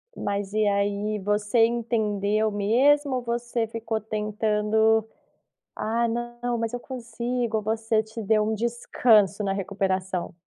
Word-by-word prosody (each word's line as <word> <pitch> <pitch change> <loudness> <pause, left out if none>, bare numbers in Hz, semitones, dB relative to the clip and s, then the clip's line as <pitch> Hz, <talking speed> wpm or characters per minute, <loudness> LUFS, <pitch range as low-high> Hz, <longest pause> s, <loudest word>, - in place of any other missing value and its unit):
Mas 200 0 -3
e 215 0 +2
aí, 205 +1 0
você 210 +3 +2
entendeu 215 -2 0
mesmo 260 +7 +3
ou 250 - -1
você 235 0 -2
ficou 225 0 -3
tentando. 215 +1 +1 0.7
"Ah 230 +2 0
não, 240 +1 -3
mas 230 0 -2
eu 245 - -2
consigo.". 235 -2 -3
Você 220 0 0
te 220 +1 -8
deu 215 +1 +2
um 220 +1 0
descanso 220 -2 +2
na 195 -1 0
recuperação? 190 -2 -2
220 Hz, 125 wpm, -25 LUFS, 205-235 Hz, 0.7 s, mesmo